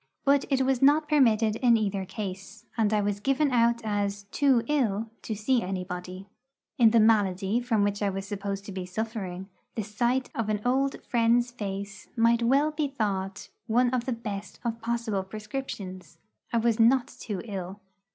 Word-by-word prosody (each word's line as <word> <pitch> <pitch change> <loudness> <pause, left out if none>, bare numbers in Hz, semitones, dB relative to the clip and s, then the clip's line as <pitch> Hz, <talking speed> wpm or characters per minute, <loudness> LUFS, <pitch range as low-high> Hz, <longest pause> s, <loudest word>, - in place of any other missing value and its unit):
But 280 0 +4
it 270 -2 +2
was 260 -1 +1
not 295 +3 +5
permitted 225 -7 +3
in 240 -2 +4
either 200 -3 -1
case, 195 0 -7
and 220 -2 +2
I 210 -1 +2
was 205 0 -1
given 275 +5 +1
out 235 -1 +3
as 205 -1 -1
'too 270 -5 +3
ill' 225 -6 0
to 220 - -4
see 235 +4 +1
anybody. 185 0 -5 0.5
In 230 -2 +7
the 230 +1 +4
malady 205 -1 +3
from 235 -4 +1
which 205 0 -1
I 205 - +2
was 195 0 -4
supposed 200 -1 -4
to 200 - -7
be 185 -1 -5
suffering, 190 -2 -4 0.3
the 220 - -2
sight 240 +5 0
of 225 -2 -2
an 210 -1 0
old 270 +2 +1
friend's 240 +1 +2
face 200 -3 -6
might 230 0 +3
well 275 +6 +3
be 305 -1 -1
thought 195 -7 -3 0.2
one 245 +2 +3
of 250 -2 -1
the 260 - -1
best 215 -4 -5
of 230 0 -2
possible 230 -3 -1
prescriptions. 210 -2 -7 0.3
I 235 - +1
was 230 0 +2
not 240 +2 +5
too 205 -9 -6
ill. 195 -2 -6
220 Hz, 175 wpm, -27 LUFS, 200-245 Hz, 0.5 s, In